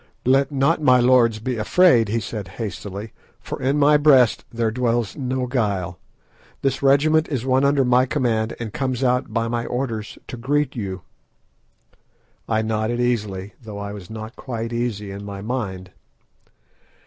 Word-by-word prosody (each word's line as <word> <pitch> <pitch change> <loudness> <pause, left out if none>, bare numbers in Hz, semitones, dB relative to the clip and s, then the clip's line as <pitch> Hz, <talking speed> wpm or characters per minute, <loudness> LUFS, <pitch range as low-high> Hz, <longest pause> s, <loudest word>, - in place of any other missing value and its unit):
"Let 135 +2 +3
not 145 +4 +2
my 130 -4 +5
lords 120 -3 +4
be 120 +2 -3
afraid," 115 - +4
he 115 +2 0
said 105 -2 -5
hastily, 100 0 -6 0.3
"for - - -7
in 135 +3 +1
my 145 +1 +5
breast 135 -5 +4
there 115 -1 0
dwells 120 -2 0
no 130 -2 -2
guile. 100 -9 -2 0.6
This 135 -1 0
regiment 155 +4 +4
is 130 -5 -2
one 130 +1 +2
under 140 -1 +3
my 125 +1 +3
command, 115 -6 0
and 110 -4 -5
comes 130 -1 -2
out 125 0 +1
by 115 -1 0
my 115 0 -2
orders 120 -4 -3
to 125 - -6
greet 145 +3 0
you." 95 -5 -5 1.5
I 110 -1 +1
nodded 110 +2 -1
easily, 105 -5 -1
though 110 -3 -8
I 100 0 -5
was 95 -4 -10
not 110 +1 -8
quite 115 -2 -5
easy 110 -4 -3
in 100 +1 -7
my 100 -1 -7
mind. 100 -6 -4
120 Hz, 160 wpm, -22 LUFS, 110-130 Hz, 1.5 s, my